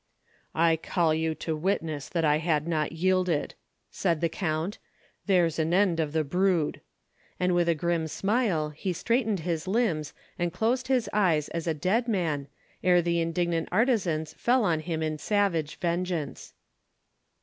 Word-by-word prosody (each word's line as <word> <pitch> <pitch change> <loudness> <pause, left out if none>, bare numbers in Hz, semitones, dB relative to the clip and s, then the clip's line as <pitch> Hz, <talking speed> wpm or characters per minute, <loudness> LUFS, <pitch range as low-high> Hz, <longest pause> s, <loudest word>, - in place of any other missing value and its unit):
"I 165 0 +3
call 165 0 +1
you 160 0 0
to 160 0 -3
witness 155 -4 -2
that 165 -3 0
I 150 0 +4
had 155 -1 0
not 155 -3 0
yielded," 180 -1 +1 0.4
said 170 -5 0
the 170 - +1
count. 160 +2 -2 0.5
"There's 175 -5 +3
an 160 +2 +1
end 185 -4 +3
of 155 -2 0
the 160 0 +1
brood!" 180 +1 +1 0.6
and 180 0 +2
with 175 -1 +2
a 170 - +3
grim 165 0 0
smile, 195 -4 0
he 180 +5 -3
straightened 220 +1 0
his 165 +1 -2
limbs, 185 - 0 0.2
and 175 0 0
closed 240 +8 0
his 255 -3 +1
eyes 170 -8 +2
as 170 0 -4
a 160 - +1
dead 195 +10 +1
man, 165 -10 -1 0.4
ere 180 -1 +4
the 170 0 +1
indignant 165 0 -1
artisans 180 - +1
fell 245 0 +3
on 170 -6 +2
him 160 0 -3
in 155 -1 -2
savage 185 -6 0
vengeance. 170 -4 -3
170 Hz, 160 wpm, -27 LUFS, 160-190 Hz, 0.6 s, I